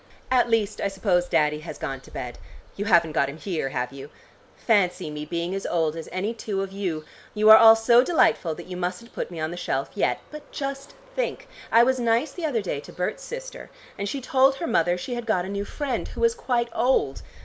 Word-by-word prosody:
At 245 -2 +3
least 220 -2 0
I - - +1
suppose 190 -3 +1
Daddy 150 -2 +2
has 155 - -8
gone 135 -1 -5
to - - -16
bed. 120 -1 -7 0.4
You 205 - -3
haven't 170 -5 +4
got 140 -2 +1
him 140 - -8
here, 160 -6 -3
have 125 0 -3
you? 140 +1 -9 0.5
Fancy 180 -7 +1
me 150 0 -5
being 170 +3 -3
as 195 - -3
old 160 -2 0
as 165 - -7
any 190 +6 -2
two 205 -4 -3
of 195 - -6
you. 180 -6 -3 0.3
You 215 +1 +6
are 220 - +12
all 225 0 +9
so 235 +2 +5
delightful, 225 - +2
that 175 - -9
you 180 - -7
mustn't 180 +6 -4
put - - -4
me 170 -2 -7
on 155 +1 -2
the 175 - -6
shelf 135 -5 -2
yet. 205 - 0
But 300 -1 -11
just 275 - -5 0.2
think! - - -2 0.2
I 230 - +7
was 260 +1 +2
nice 235 +4 +1
the 330 +1 -3
other 235 -8 -1
day 150 -6 -3
to - - -11
Berts' 180 - -3
sister, - - -8 0.3
and 200 0 -3
she 275 - -4
told 265 +1 +3
her 335 - -4
mother 175 - +2
she 245 +8 -5
had 240 -1 -5
got 185 -5 +1
a - - -6
new 200 0 -3
friend, 275 +1 -3
who - - -8
was 465 0 +4
quite 245 - -1
old. 235 - +1
200 Hz, 230 wpm, -25 LUFS, 170-245 Hz, 0.5 s, are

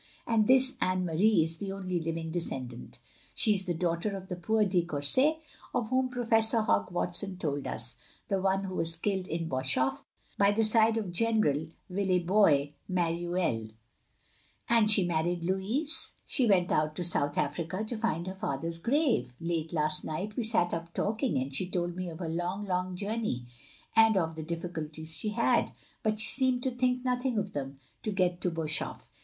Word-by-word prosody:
And 220 -2 +2
this 260 0 +5
Anne 185 0 +1
Marie 175 +2 +3
is 160 +1 -2
the 195 -1 -4
only 185 -2 -2
living 165 0 -3
descendant. 130 -8 -3 0.4
She 215 -4 +4
is 190 -2 0
the 175 -2 -1
daugh 170 0 -1
ter 200 0 -2
of 190 0 -11
the 180 - -3
poor 215 +5 +1
de 180 -3 +2
Courset 175 - +3 0.4
of 235 -3 0
whom 255 0 +2
Professor 225 -2 +2
Hogg 100 - +1
Watson 180 +2 -1
told 145 -5 -2
us, 115 +1 -1 0.3
the 195 -1 0
one 195 0 +1
who 190 -1 -5
was 165 -2 +1
killed 190 +1 -1
at 165 0 -2
Boshof, 130 -1 0 0.4
by 200 0 +5
the 225 +2 +2
side 225 +1 +4
of 205 -5 -3
General 180 -7 +1
de - - -20 0.2
Villebois 180 -5 +3 0.2
Mareuil. 170 -10 -1 0.5
" - - -32
"And 225 -2 +5
she 205 -3 +5
married 170 +1 0
Louis?" 195 - -1 0.4
"She 255 -5 +2
went 185 -4 +3
out 155 0 +1
to 180 - -2
South 145 -4 0
Africa 165 +7 -1
— - - -11
^to 235 - -2
find 215 -7 -1
her 185 - -4
father's 165 -2 -3
grave. 230 - +1
Late 165 -1 -2
last 155 -2 +1
night 190 +7 -4
we - - -1
sat 220 -6 +1
up 170 0 -5
talking, 225 +5 0
and 130 +1 -2
she 180 +7 -1
told 175 -1 -2
me 185 -1 -4
of 160 - -8
her 175 -1 -4
long, 175 +5 -2
long 185 -1 -1
journey, 205 - -2 0.5
and 225 -2 +6
of 165 -3 0
the 160 - -5
difficulties 160 -1 -4
she 210 +8 -2
had 210 - +2 0.2
— - - -33
^but 215 -1 +1
she 220 +1 0
seemed 255 -2 +2
to 260 - 0
think 250 0 0
nothing 250 -1 0
of 200 -1 -2
them 135 -1 -5
— - - -39
^to 210 -2 -2
get 180 -2 +1
to 180 - +1
Boshof. 160 -2 -2
180 Hz, 195 wpm, -30 LUFS, 165-215 Hz, 0.5 s, and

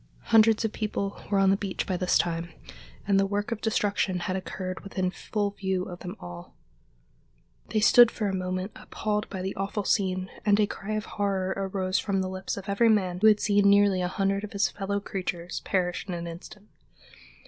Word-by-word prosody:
Hundreds 225 0 +6
of 220 - -2
people 200 -2 -3
were 205 - +2
on 195 0 +5
the - - +4
beach 195 -1 -3
by 185 - -1
this 180 0 +2
time, 170 0 -1 0.6
and 195 -1 +4
the 195 - +3
work 205 +2 -2
of 230 - -3
destruction 205 -4 0
had 185 - -2
occurred 185 0 -5
within 185 -2 -2
full 205 +1 -2
view 190 -2 -2
of 180 -1 -8
them 180 0 -7
all. 85 0 -10 1.1
They 215 - +1
stood 240 +2 +8
for 215 -2 -3
a 195 - -1
moment 185 +1 -2
appalled 210 0 -3
by 190 -3 -5
the 190 - -3
awful 200 +2 -2
scene, 185 -2 0
and 205 0 +3
a 210 - +5
cry 205 +1 -5
of 215 0 -2
horror 195 -2 -1
arose 190 -1 -1
from 195 -2 0
the 185 - -2
lips 190 +1 -4
of 200 +1 -7
every 205 +4 +3
man 185 -5 +2
who 220 - +6
had 210 -1 +6
seen 205 -1 +3
nearly 200 -2 +4
a 180 - 0
hundred 195 +1 0
of 210 - -7
his 200 -1 +2
fellow 200 0 -2
creatures 180 -3 -4
perish 180 -1 -1
in 180 - -3
an 170 0 -5
instant. 180 +5 -10
195 Hz, 205 wpm, -27 LUFS, 185-205 Hz, 1.1 s, stood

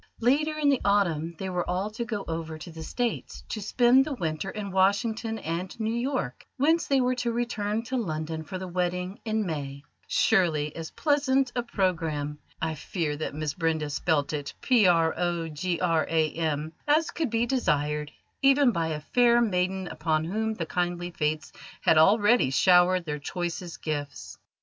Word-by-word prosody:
Later 300 +6 +2
in 295 -2 +3
the 275 -3 +2
autumn 170 -5 +1
they 190 - -4
were 180 -1 -2
all 190 +4 -1
to 225 +2 -4
go 215 -4 -4
over 160 -1 -4
to 160 +2 -9
the 160 0 -9
States 235 +8 -3
to 215 - -4
spend 245 +5 +4
the 295 -1 -4
winter 165 -3 -3
in 200 -1 -5
Washington 220 +4 +1
and 175 +3 -4
New 220 0 -1
York, 235 - -2
whence 320 +5 +2
they 275 -1 +3
were 250 0 +2
to 245 -1 -1
return 225 -2 -1
to 255 +3 -3
London 160 -6 -3
for 185 +4 -6
the 185 0 -6
wedding 180 +1 -2
in 220 -1 0
May: 140 -4 -5 0.2
surely 155 -5 +2
as 165 -1 -6
pleasant 275 -3 +1
a 245 - +1
programme 165 -9 -1 0.2
I 160 -1 -1
fear 155 0 -3
that 150 -1 -4
Miss 155 -1 -2
Brenda 160 -3 -1
spelt 145 -2 0
it 145 -2 -4
"program" 175 -10 +4 1.7
as 310 +2 +3
could 320 -6 -2
be 230 +1 +1
desired 150 - 0 0.3
even 275 -1 +5
by 165 -5 -1
a 155 -2 -3
fair 240 +7 +4
maiden 190 -4 0
upon 155 -1 -1
whom 220 +6 -2
the 170 - -3
kindly 175 +1 -2
Fates 155 -2 -2 0.3
had 160 - +5
already 205 - +5
showered 180 +4 +4
their 150 -2 -3
choicest 175 +3 -5
gifts. 140 - -5
185 Hz, 165 wpm, -27 LUFS, 160-235 Hz, 1.7 s, even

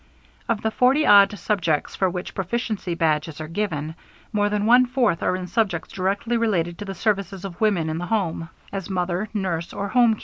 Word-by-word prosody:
Of 225 -2 0
the 220 - +1
forty 265 +6 +3
odd 200 0 +6
subjects 170 -9 -1
for 190 - +1
which 180 0 -5
Proficiency 195 -2 -2
Badges 155 -1 0
are 155 - -5
given, 160 -4 -3 0.4
more 205 -1 +2
than 210 0 0
one 245 +2 +6
fourth 245 -9 +1
are - - +1
in 185 0 -4
subjects 185 -4 -1
directly 200 +5 0
related 175 -7 0
to 205 - -5
the 195 -1 -6
services 195 -1 -1
of 180 -1 -8
woman 200 -7 +2
in 160 +1 -2
the 175 - -4
home, 170 -6 -1 0.2
as 195 -1 -4
mother, 185 +2 -1
nurse, 175 -5 -3
or 200 0 -3
home 240 -2 +4
keeper. - - -16
195 Hz, 200 wpm, -23 LUFS, 170-215 Hz, 0.4 s, odd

